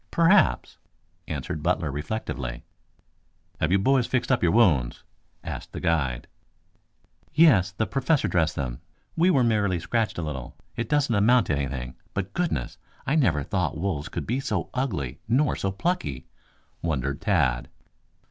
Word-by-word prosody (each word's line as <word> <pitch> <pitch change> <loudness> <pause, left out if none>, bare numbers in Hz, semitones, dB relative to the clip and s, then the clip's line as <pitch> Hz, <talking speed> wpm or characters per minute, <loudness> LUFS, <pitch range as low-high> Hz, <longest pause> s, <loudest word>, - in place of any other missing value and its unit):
"Perhaps," 180 +4 +3 0.5
answered 80 - -4
Butler 85 -2 0
reflectively. 70 - -4 1.0
"Have 80 - +1
you 100 - +5
boys 130 +4 +2
fixed 130 0 0
up 125 - +3
your 85 - +3
wounds?" 80 - +3 0.4
asked - - -7
the - - -4
guide. 75 -8 0 1.1
"Yes, 135 - +6
the 110 +4 -1
Professor 135 +3 +1
dressed 85 -1 +1
them. 65 -3 -4 0.3
We 170 +3 +4
were 135 -8 +4
merely 105 -6 +1
scratched 110 +6 -1
a 85 - -2
little. 70 -5 -6 0.2
It 115 -1 -3
doesn't 145 -5 +2
amount 115 +4 +4
to 75 - 0
anything. 65 -3 -4 0.2
But 100 0 -3
goodness! 160 - -2 0.3
I 140 - 0
never 90 - +2
thought 90 -2 -1
wolves 80 -4 -2
could - - -4
be 125 +4 -1
so 105 -9 -2
ugly 95 - -2
nor 130 +5 +2
so 95 - -2
plucky," 95 - -2 0.6
wondered 70 -2 -2
Tad. 70 - +1
95 Hz, 145 wpm, -25 LUFS, -, 1.1 s, Yes